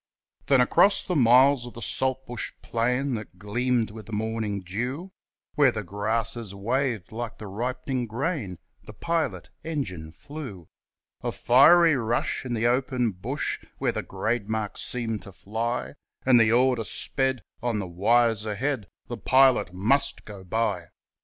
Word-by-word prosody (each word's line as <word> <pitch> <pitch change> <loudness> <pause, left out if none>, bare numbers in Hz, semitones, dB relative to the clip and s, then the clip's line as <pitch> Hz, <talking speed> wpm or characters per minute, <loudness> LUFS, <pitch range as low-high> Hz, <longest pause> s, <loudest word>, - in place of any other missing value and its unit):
Then 135 -2 +5
across 195 +10 +4
the 180 - -1
miles 130 0 +5
of 120 - -11
the 115 - -8
saltbush 130 -2 -2
plain 125 +4 0
That 105 -5 -6
gleamed 115 +3 0
with 110 0 -10
the - - -10
morning 110 -2 -2
dew, 125 - -4 0.4
Where 145 -4 +4
the 105 -2 -4
grasses 105 +2 -2
waved 115 -1 -1
like 115 0 -5
the 110 - -9
ripening 125 +4 -3
grain 120 - -3 0.3
The - - -11
pilot 165 -1 -2
engine 95 - -4
flew, 125 - -9 0.5
A - - -2
fiery 155 +6 +6
rush 120 +1 -1
in 120 - -2
the 115 +1 0
open 125 -1 +1
bush 90 -1 -3 0.2
Where - - 0
the - - -3
grade 110 -2 -2
marks 110 -2 -2
seemed 115 -3 -2
to 100 - -11
fly, 115 +6 -3 0.3
And 130 -2 +6
the 115 -1 +4
order 125 -1 +3
sped 130 +2 -1 0.2
on 120 -3 -1
the 100 - -2
wires 110 +5 +2
ahead, 110 +1 -2 0.2
The 120 - -6
pilot 130 -3 +4
MUST 110 +10 +1
go 100 -3 -10
by. 95 -3 -1
120 Hz, 150 wpm, -26 LUFS, 105-130 Hz, 0.5 s, fiery